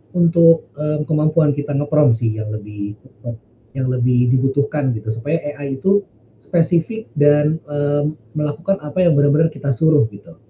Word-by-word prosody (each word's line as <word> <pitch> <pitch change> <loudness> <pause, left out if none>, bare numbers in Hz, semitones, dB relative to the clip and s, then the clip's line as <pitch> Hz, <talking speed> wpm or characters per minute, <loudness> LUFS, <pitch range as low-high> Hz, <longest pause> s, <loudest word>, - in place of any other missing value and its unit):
untuk, 165 -1 +4
mmm, 150 +1 -2
kemampuan 155 0 +2
kita 145 0 -4
nge-prompt 145 -3 +3
sih 115 -2 -1
yang 110 - -4
lebih 105 -1 -7 0.3
apa, 120 -1 -6 0.4
yang 130 -1 -2
lebih 125 0 +2
dibutuhkan 135 +1 0
gitu 110 0 -8
supaya 145 +8 -2 0.2
AI 140 -2 -5
itu, 200 +5 +2 0.4
spesifik 170 - -1
dan, 150 +2 +3
mmm, 145 0 -1 0.3
melakukan 150 +6 -2
apa 150 +5 -5
yang 170 -4 +4
benar-benar 145 +3 +3
kita 140 -1 -3
suruh 150 +1 +3
gitu. 100 -4 -15
145 Hz, 150 wpm, -18 LUFS, 130-160 Hz, 0.4 s, untuk